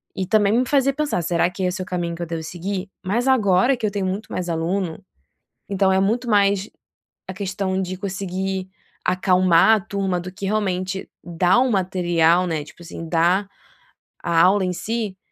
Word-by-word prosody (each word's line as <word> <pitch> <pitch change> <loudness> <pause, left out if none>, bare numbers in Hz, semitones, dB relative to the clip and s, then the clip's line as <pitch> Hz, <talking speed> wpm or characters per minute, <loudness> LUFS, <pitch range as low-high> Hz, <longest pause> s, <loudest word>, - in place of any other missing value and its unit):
e 190 - -2
também 205 0 +3
me 255 - +2
fazia 275 -1 +2
pensar: 295 -10 -1
"Será 170 +1 +1
que 185 +1 -5
esse 185 +1 -1
é - - -2
o - - -10
caminho 175 -2 -3
que 170 - -9
eu - - -3
devo 165 0 -4
seguir", 185 +4 -4 0.2
mas 235 +7 0
agora 235 -1 +4
que 230 - -3
eu 210 - 0
tenho 200 -2 -2
muito 195 +4 -4
mais 180 - -3
aluno, 170 +2 -2 0.7
então 195 -1 +2
é 190 - +3
muito 235 +5 0
mais 200 -1 +2 0.6
a - - -4
questão 190 0 -2
de 185 0 -4
conseguir 190 0 -3 0.4
acalmar 185 +2 +4
a 215 - -2
turma 190 -2 -2
do 180 +1 -7
que 195 - -8
realmente 190 -2 -2
dar 175 +4 +2
o 260 0 +2
material, 180 -3 +2
né, 160 -4 -2
tipo, 150 +3 -15
assim, 165 -1 -8
dá 180 +4 +2 0.8
a 165 -1 +3
aula 190 +3 +4
em 180 - -1
si, 215 -1 -3
190 Hz, 190 wpm, -22 LUFS, 180-200 Hz, 0.8 s, agora